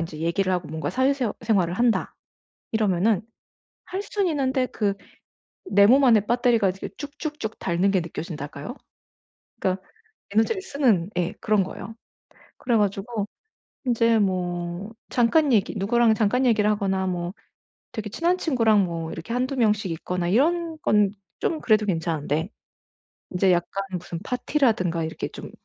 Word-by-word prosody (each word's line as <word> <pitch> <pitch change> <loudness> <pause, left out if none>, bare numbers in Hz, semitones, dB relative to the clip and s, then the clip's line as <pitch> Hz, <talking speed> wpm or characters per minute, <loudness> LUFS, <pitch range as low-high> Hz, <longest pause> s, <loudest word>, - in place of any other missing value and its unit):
인제 165 -2 -5
얘기를 170 +4 0
하고 180 -3 -2
뭔가 160 +1 -3
사회 260 +2 +2
새 255 -5 -1
생활을 195 -6 +1
한다 235 +1 +1 0.6
이러면은 205 -1 +2 0.6
할 380 +2 -4
수는 410 -2 -1
있는데 265 -3 +1
그 205 -2 -1 0.7
내 200 - +5
몸 270 +6 +6
안에 225 -5 +5
배터리가 235 -3 +3
이제 190 +1 -5
쭉쭉쭉 290 -5 -5
닳는 180 +2 +1
게 190 -3 +2
느껴진달까요? 160 - -6 0.8
그러니까 185 0 0 0.5
에너지를 225 - +1
쓰는 240 - +1
예 180 +3 0
그런 215 -2 +2
거예요. 195 +3 -7 0.6
그래 240 -2 +1
가지고 205 +1 -1 0.6
인제 230 -2 +3
뭐 180 0 -2 0.2
잠깐 255 +3 +3
얘기 200 - +2
누구랑 230 +3 +3
잠깐 225 +4 +2
얘기를 220 -4 +3
하거나 195 -2 0
뭐 175 -1 -2 0.6
되게 215 -1 -5
친한 345 +6 +1
친구랑 230 - +3
뭐 165 -2 -4
이렇게 165 +8 -6
1-2 255 +3 -1
명씩 210 -5 +2
있거나 175 +2 -3
이런 325 - +2
건 210 -5 +3 0.3
좀 320 -2 -1
그래도 215 -2 +3
괜찮은데 160 -2 -1 0.8
인제 185 0 +3
약간 180 +3 -1 0.2
무슨 170 -1 -7
파티라든가 220 - +1
이렇게 160 0 -4
좀 - - -9
210 Hz, 310 characters per minute, -24 LUFS, 180-245 Hz, 0.8 s, 몸